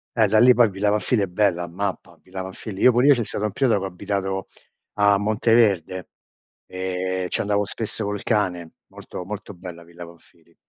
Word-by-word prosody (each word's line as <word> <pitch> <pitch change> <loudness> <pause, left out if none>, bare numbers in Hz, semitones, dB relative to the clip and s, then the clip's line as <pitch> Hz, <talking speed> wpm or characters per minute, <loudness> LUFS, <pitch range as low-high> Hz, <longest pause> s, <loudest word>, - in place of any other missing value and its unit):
Eh, 110 -2 +4
da 110 +2 +3
lì 125 +1 +7
poi 120 -3 +5
Villa 100 +2 -1
Pamphili 105 +1 +1
è - - -1
bella, 90 -2 +1
ammappa. 95 +3 -5
Villa 95 0 -7
Pamphili. 95 +2 -8
Io 125 - +7
pure 125 +4 +3
io 145 - +8
c'è 120 -3 -1
stato 105 +1 -3
un 105 - -1
periodo 120 -3 +2
che 95 - -4
ho - - -2
abitato 95 +1 -3 0.5
a 100 -1 +4
Monteverde, 105 -4 +1 0.6
ehm, 95 0 -3
ci - - -2
andavo 105 0 +1
spesso 110 +1 -3
col 105 -1 -3
cane. 90 -7 -1
Molto, 90 - -9
molto 105 +1 -7
bella 85 -2 -10
Villa 85 +1 -11
Pamphili. 85 0 -19
100 Hz, 190 wpm, -23 LUFS, 90-105 Hz, 0.6 s, io